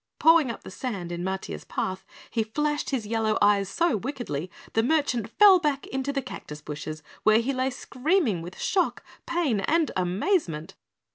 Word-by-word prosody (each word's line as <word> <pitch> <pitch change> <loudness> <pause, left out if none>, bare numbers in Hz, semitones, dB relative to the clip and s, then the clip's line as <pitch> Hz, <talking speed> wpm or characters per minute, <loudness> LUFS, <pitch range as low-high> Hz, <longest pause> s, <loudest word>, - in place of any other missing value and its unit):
Pawing 325 -4 +5
up 230 - -6
the - - -9
sand 190 -6 -4
in 175 0 -4
Matiah's 190 +1 -4
path, 190 0 -4 0.2
he 230 - +1
flashed 295 +6 -1
his 255 -6 -1
yellow 220 0 +1
eyes 205 -1 +3
so 335 - +1
wickedly, 215 - -4 0.2
the 225 - +3
merchant 245 -5 +1
fell 390 - +7
back 295 -4 -1
into 265 +1 -2
the 275 -1 -2
cactus 150 -8 -8
bushes, 155 +1 -6 0.2
where 215 0 +5
he 240 +4 0
lay 260 0 0
screaming 260 - 0
with 175 +2 -9
shock, 370 -2 0 0.2
pain 335 -11 +1
and 320 +10 +1
amazement. 185 - 0
230 Hz, 165 wpm, -26 LUFS, 190-295 Hz, 0.2 s, fell